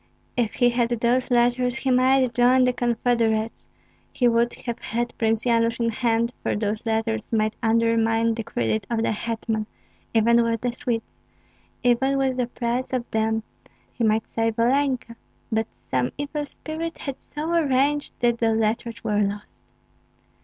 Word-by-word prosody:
If 235 -3 0
he 245 -1 +4
had 235 -1 +1
those 240 +2 +1
letters 245 0 +2
he 260 +2 -1
might 255 0 +3
join 250 +2 +4
the 250 0 +3
confederates, 230 -2 0 0.4
he 245 - +2
would 235 0 +3
have 235 -1 -3
had 240 +1 -3
Prince 225 0 +1
Yanush 230 -1 +2
in 230 -1 +1
hand, 230 +1 0
for - - -1
those 210 0 -2
letters 225 0 -1
might 215 -1 +1
undermine 230 0 +2
the 225 - -3
credit 115 - -1
of 230 -1 0
the - - +1
hetman, 220 0 -2 0.4
even 235 +1 +4
with 230 -1 0
the 245 - 0
Swedes, 240 -3 -2 0.8
even 265 +3 +3
with 265 -1 0
the 250 -2 0
price 245 +2 -3
of 245 -2 -2
them 220 0 0 0.5
he 240 - -3
might 220 0 +2
save 225 0 -1
Olenka; 255 0 +1 0.4
but 220 0 0 0.2
some 125 -1 +1
evil 290 +1 -3
spirit 320 +4 -6
had 275 -2 -6
so 310 +3 -4
arranged 290 -2 +2
that 240 -1 +2
the 225 -1 +2
letters 225 +1 -1
were 210 -1 +1
lost. 205 0 -4
235 Hz, 160 wpm, -24 LUFS, 225-250 Hz, 0.8 s, he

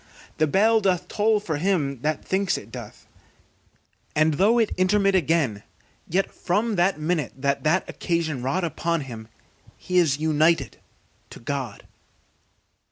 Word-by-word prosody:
The 155 - +3
bell 220 +8 +3
doth 185 -2 0
toll 215 +2 +2
for 160 -7 -3
him 145 -7 0
that 155 +2 -2
thinks 190 0 0
it 105 - -11
doth; 120 -4 -10 1.1
and 155 +1 +3
though 205 +10 +3
it 225 -3 +2
intermit 195 +2 +2
again, 160 - +1 0.5
yet 190 +4 0
from 210 +5 -1
that 175 -1 +2
minute 155 -3 -1
that 140 +1 -1
this 160 +5 +2
occasion 165 -6 -2
wrought 135 +9 -1
upon 170 0 -1
him, 115 -5 -8 0.5
he 180 0 +1
is 150 -6 +2
united 155 -3 +1 0.5
to - - -11
God. 130 -4 -5
165 Hz, 140 wpm, -24 LUFS, 140-190 Hz, 1.1 s, The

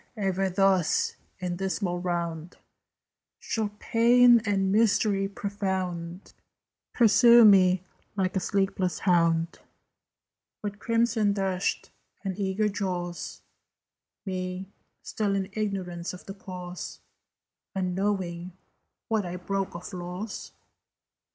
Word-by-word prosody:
Ever 195 -1 0
thus, 190 -2 +2 0.2
in 180 -1 -3
dismal 190 -1 -2
round, 170 -2 -3 0.8
Shall 220 -2 -2
Pain 240 +2 +5
and 195 -2 +1
Mystery 205 -2 +3
profound 190 -3 -4 0.6
Pursue 235 0 +7
me 185 -3 +6 0.3
like 190 0 -1
a - - +2
sleepless 190 -2 0
hound, 170 -2 +2 1.0
"With 205 0 -4
crimson 230 -2 +2
dashed 190 -2 -1 0.3
and 190 -2 -3
eager 200 +2 +1
jaws, 180 -4 -4 0.8
Me, 185 0 -4 0.4
still 215 -2 -1
in 190 -1 -2
ignorance 185 -5 -3
of 180 - -11
the 195 - -7
cause, 180 -2 -8 0.8
Unknowing 185 -2 -2 0.5
what 220 -2 +1
I 180 -1 -5
broke 190 +1 -3
of 175 +2 -8
laws?" 180 +4 -6
190 Hz, 100 wpm, -27 LUFS, 180-205 Hz, 1.0 s, Pursue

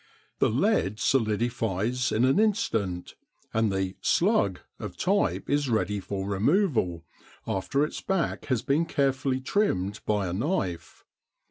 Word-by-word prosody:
The - - +4
lead 95 +5 +1
solidifies 115 -1 0
in 115 +4 +3
an 135 +9 +3
instant, 110 - 0 0.4
and 110 -2 +2
the 95 -1 -2
"slug" 170 - +2 0.2
of - - -7
type 200 +2 +1
is 145 -1 +1
ready 105 -3 0
for 95 0 -4
removal, 100 - +1 0.4
after 95 +10 0
its - - -6
back 190 -3 -1
has 125 -4 0
been 145 +5 +1
carefully 135 -2 0
trimmed 105 - 0
by 105 -2 +1
a 85 - -3
knife. 95 - -3
115 Hz, 130 wpm, -27 LUFS, 95-145 Hz, 0.4 s, The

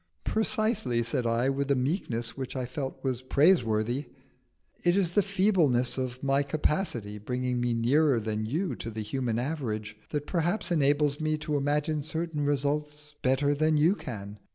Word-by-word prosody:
"Precisely," 215 - +1
said 120 +1 -1
I, 115 +3 +2
with 140 +1 -1
a 140 - +4
meekness 125 - -1
which 130 -1 -5
I 130 -1 -2
felt 130 +2 -5
was 130 -2 -1
praiseworthy; 130 - +2 0.8
"it 175 +2 +3
is 180 -4 +2
the 205 - +4
feebleness 185 - +2
of 130 -1 -4
my 135 0 +3
capacity, 140 - -1
bringing 125 +3 -2
me 120 -1 +1
nearer 130 +3 +3
than 110 0 -2
you 165 - -1
to 115 - -5
the 110 -1 -5
human 120 0 -2
average, 115 -6 -3
that 145 -1 -2
perhaps 175 +4 -1
enables 145 -2 +2
me 155 0 +1
to 150 0 -3
imagine 150 +2 0
certain 160 +1 -3
results 150 +1 -1
better 135 +3 +2
than 155 +1 +2
you 160 +5 +5
can. 105 - -7
140 Hz, 160 wpm, -28 LUFS, 120-155 Hz, 0.8 s, you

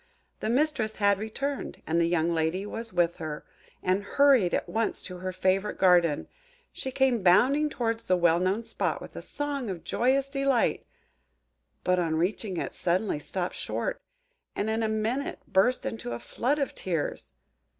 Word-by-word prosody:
The - - -2
mistress 250 -4 +1
had 200 -1 +3
returned; 275 +6 -4
and 165 +1 +1
the 165 - +3
young 170 0 +1
lady 165 +4 0
was 225 +2 -5
with 175 -1 +1
her, 155 -2 -6 0.4
and 185 +2 +2
hurried 260 -5 +4
at - - -1
once 225 0 -1
to 180 - -7
her 185 +1 -4
favourite 190 +2 0
garden. 175 -5 +4 0.5
She 265 - -5
came 260 -4 +2
bounding 255 +12 +4
towards 230 -4 -2
the 185 - +3
well 170 -1 +4
known 190 +5 0
spot - - -1
with - - -11
a - - -5
song 285 -5 -3
of 180 -4 -5
joyous 265 +3 +1
delight; 275 -3 +1 1.0
but, 180 0 +2
on 165 -2 0
reaching 185 +3 -1
it, - - -3
suddenly 180 -1 0
stopped 180 +4 -3
short, - - -3 0.5
and 215 +2 -1
in 220 +1 0
a 220 - +1
minute 220 +6 -1
after - - -30
burst 245 +7 +3
into 170 - -4
a 120 - -4
flood 270 - -1
of 280 -2 -1
tears! 155 - -3
205 Hz, 170 wpm, -28 LUFS, 175-250 Hz, 1.0 s, hurried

